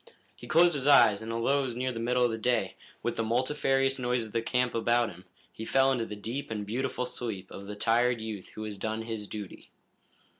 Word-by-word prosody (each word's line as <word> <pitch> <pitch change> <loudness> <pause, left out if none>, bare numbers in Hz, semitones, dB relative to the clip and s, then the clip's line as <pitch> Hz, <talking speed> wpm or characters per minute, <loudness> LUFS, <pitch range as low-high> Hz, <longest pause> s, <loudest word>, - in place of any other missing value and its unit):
He - - -12
closed 170 +2 +5
his 140 -1 -2
eyes, 110 -8 +6
and 110 +1 -5
although 115 +5 +1
it 140 - 0
was 120 -3 -4
near 130 +1 -1
the 115 - -5
middle 125 +2 +1
of 120 - +1
the 110 - -3
day, 120 -5 +1 0.3
with - - -2
the 115 - +1
multifarious 135 +3 +1
noises 125 -2 0
of - - -17
the 115 - +1
camp 125 +1 0
about 120 0 +2
him, 90 +1 -14 0.3
he 110 - -7
fell 135 +3 +3
into 120 -3 -1
the 105 - -6
deep 120 +7 -5
and 105 -2 -3
beautiful 125 +3 -2
sleep 110 -7 -4
of 100 0 -9
the 105 - -6
tired 120 +3 +2
youth 110 -4 -6
who 110 - -5
has 105 -2 -6
done 110 +2 -3
his 110 -2 -5
duty. 105 -3 -8
115 Hz, 230 wpm, -29 LUFS, 110-130 Hz, 0.3 s, eyes